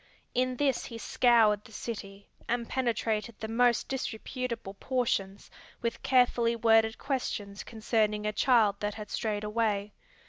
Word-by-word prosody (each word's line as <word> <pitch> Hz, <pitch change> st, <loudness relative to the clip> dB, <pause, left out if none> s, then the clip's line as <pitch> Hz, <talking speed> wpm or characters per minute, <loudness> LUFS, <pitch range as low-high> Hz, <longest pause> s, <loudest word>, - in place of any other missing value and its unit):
In 255 Hz, 0 st, +1 dB
this 270 Hz, -1 st, +1 dB
he 230 Hz, -, -7 dB
scoured 225 Hz, -3 st, +3 dB
the -, -, -15 dB
city, 200 Hz, -3 st, -7 dB, 0.2 s
and 235 Hz, -1 st, -1 dB
penetrated 230 Hz, -3 st, -1 dB
the 220 Hz, -, -4 dB
most 235 Hz, +1 st, +2 dB
disreputable 250 Hz, -4 st, -4 dB
portions 205 Hz, -4 st, -2 dB, 0.3 s
with 235 Hz, -, -2 dB
carefully 245 Hz, -2 st, +3 dB
worded 225 Hz, -1 st, +4 dB
questions 210 Hz, -7 st, -3 dB
concerning 215 Hz, -2 st, 0 dB
a 210 Hz, -, 0 dB
child 220 Hz, -5 st, +4 dB
that 205 Hz, 0 st, -2 dB
had 210 Hz, -2 st, -8 dB
strayed 215 Hz, -2 st, -2 dB
away. 210 Hz, -1 st, -1 dB
225 Hz, 135 wpm, -29 LUFS, 210-245 Hz, 0.3 s, worded